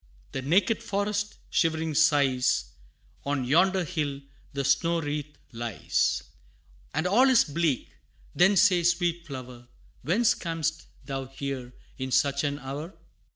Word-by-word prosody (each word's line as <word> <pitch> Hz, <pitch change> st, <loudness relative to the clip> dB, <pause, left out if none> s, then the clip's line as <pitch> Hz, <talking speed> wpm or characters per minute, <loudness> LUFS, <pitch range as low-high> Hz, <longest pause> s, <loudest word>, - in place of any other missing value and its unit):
The 135 Hz, -, -3 dB
naked 190 Hz, -, +2 dB
forest 205 Hz, +1 st, -2 dB
Shivering 160 Hz, -2 st, +1 dB
sighs, 140 Hz, -4 st, +2 dB, 0.5 s
On 140 Hz, -2 st, -1 dB
yonder 185 Hz, +7 st, +3 dB
hill 150 Hz, -5 st, -3 dB, 0.3 s
The 140 Hz, -1 st, -3 dB
snow 170 Hz, +4 st, +2 dB
wreath 150 Hz, -1 st, -4 dB
lies, 115 Hz, -, -1 dB, 0.7 s
And 160 Hz, +3 st, -1 dB
all 240 Hz, +9 st, +5 dB
is 255 Hz, -3 st, +6 dB
bleak 155 Hz, -3 st, -1 dB, 0.4 s
Then 190 Hz, +3 st, +4 dB
say, 185 Hz, -3 st, +5 dB
sweet 170 Hz, -1 st, +1 dB
flower, 125 Hz, -3 st, -9 dB, 0.3 s
Whence 215 Hz, +8 st, +3 dB
cam'st 165 Hz, -1 st, -3 dB, 0.2 s
thou 135 Hz, -1 st, -4 dB
here 135 Hz, -2 st, -6 dB, 0.3 s
In 130 Hz, 0 st, -3 dB
such 140 Hz, +2 st, +2 dB
an 145 Hz, -1 st, -1 dB
hour? 145 Hz, +6 st, -7 dB
150 Hz, 125 wpm, -27 LUFS, 135-175 Hz, 0.7 s, is